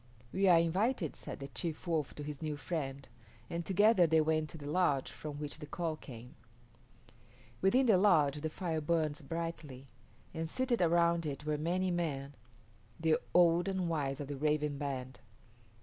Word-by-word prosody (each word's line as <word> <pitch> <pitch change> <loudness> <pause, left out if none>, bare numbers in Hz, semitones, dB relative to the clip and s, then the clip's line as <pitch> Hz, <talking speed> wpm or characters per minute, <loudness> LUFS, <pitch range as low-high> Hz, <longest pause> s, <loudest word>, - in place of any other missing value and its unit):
"We 195 +1 +2
are 175 -2 +7
invited," 180 - +1
said - - -7
the 135 - -6
chief 165 0 -4
Wolf 160 -5 -1
to 150 - -6
his 150 0 -6
new 155 -2 -3
friend, 140 -4 -4 0.4
and 170 0 -2
together 195 0 +4
they 160 0 +4
went 155 0 +1
to 165 - -9
the 145 - -9
lodge 145 -3 +1
from 150 -2 -7
which 150 +1 -5
the 150 - -8
call 165 +1 -2
came. 125 -5 -11 1.3
Within 250 +8 +4
the 210 -6 +5
lodge 150 -7 +4
the 160 - -2
fire 160 -1 -3
burned 155 -1 0
brightly, 165 -6 -5 0.5
and 160 -1 -3
seated 255 +1 0
around 170 -1 +3
it 145 0 -5
were 150 0 0
many 180 +5 0
men, 145 -5 -2 0.7
the 160 -1 +3 0.2
old 175 0 +5
and 190 -2 -1
wise 140 -4 -1
of 145 - -5
the 145 -1 -5
Raven 150 0 0
band. 130 -4 -4
160 Hz, 170 wpm, -33 LUFS, 145-175 Hz, 1.3 s, are